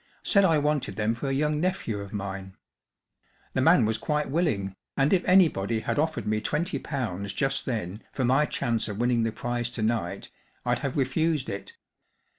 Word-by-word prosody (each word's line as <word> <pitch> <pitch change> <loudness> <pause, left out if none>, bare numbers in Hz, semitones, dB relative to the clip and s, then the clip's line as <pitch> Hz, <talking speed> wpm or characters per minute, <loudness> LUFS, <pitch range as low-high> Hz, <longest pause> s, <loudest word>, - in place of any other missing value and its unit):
Said 200 -2 +4
I 165 -4 +4
wanted 150 -1 0
them 110 0 +1
for 120 +4 -4
a - - 0
young 150 +2 +1
nephew 180 - -1
of 100 -1 -7
mine. 95 -2 -5 1.0
The - - +1
man - - +6
was 110 0 0
quite 150 0 -1
willing, 115 - 0 0.2
and 140 +4 +3
if 185 - +3
anybody 120 - +4
had 145 - -1
offered 155 -8 0
me 110 0 0
twenty 170 - -1
pounds 100 - -3
just 135 +4 0
then 110 -4 -3
for 130 - -1
my 135 +5 +3
chance 115 -2 -1
of 105 -2 -5
winning 120 0 +2
the 115 0 +1
prize 120 +1 -2
to 115 -2 -4
night 105 -4 -2 0.3
I'd - - +1
have 135 -1 -3
refused 145 +1 +1
it. 100 0 -7
120 Hz, 185 wpm, -27 LUFS, 105-150 Hz, 1.0 s, man